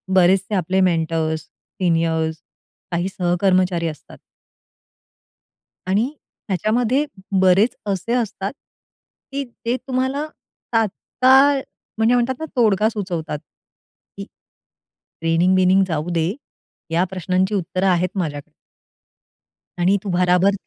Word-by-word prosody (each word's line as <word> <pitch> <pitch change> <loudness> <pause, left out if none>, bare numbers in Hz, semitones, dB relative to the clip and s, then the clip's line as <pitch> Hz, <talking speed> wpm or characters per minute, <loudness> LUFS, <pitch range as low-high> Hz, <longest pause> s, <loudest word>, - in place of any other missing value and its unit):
बरेचसे 190 +3 +3
आपले 185 +1 0
mentors, 160 -2 +1
seniors, 165 -3 -1 0.6
काही 175 +2 0
सहकर्मचारी 180 -1 +2
असतात 155 - -9 1.7
आणि 205 +5 +2 0.4
ह्याच्यामध्ये 235 - +1 0.4
बरेच 190 +5 +4
असे 200 +4 -1
असतात 220 -3 -2 0.8
की 280 0 -2 0.2
ते 235 - +1
तुम्हाला 260 +3 -1 0.5
तात्काळ 260 +5 +3 0.4
म्हणजे 225 +2 +3
म्हणतात 245 +2 +1
ना 320 - -3
तोडगा 215 -2 +3
सुचवतात. 175 -8 -4 0.8
की - - -5 1.0
ट्रेनिंग-बिनिंग 185 +3 +3
जाऊ 160 0 -2
दे 170 +3 0 0.6
या 170 +2 +2
प्रश्नांची 185 +2 0
उत्तरं 185 +1 -1
आहेत 180 0 +2
माझ्याकडे. 145 -6 -4 1.3
आणि 185 +3 +3
तू 200 - -4
भराभर, 180 +2 +3
185 Hz, 95 wpm, -21 LUFS, 175-220 Hz, 1.7 s, बरेच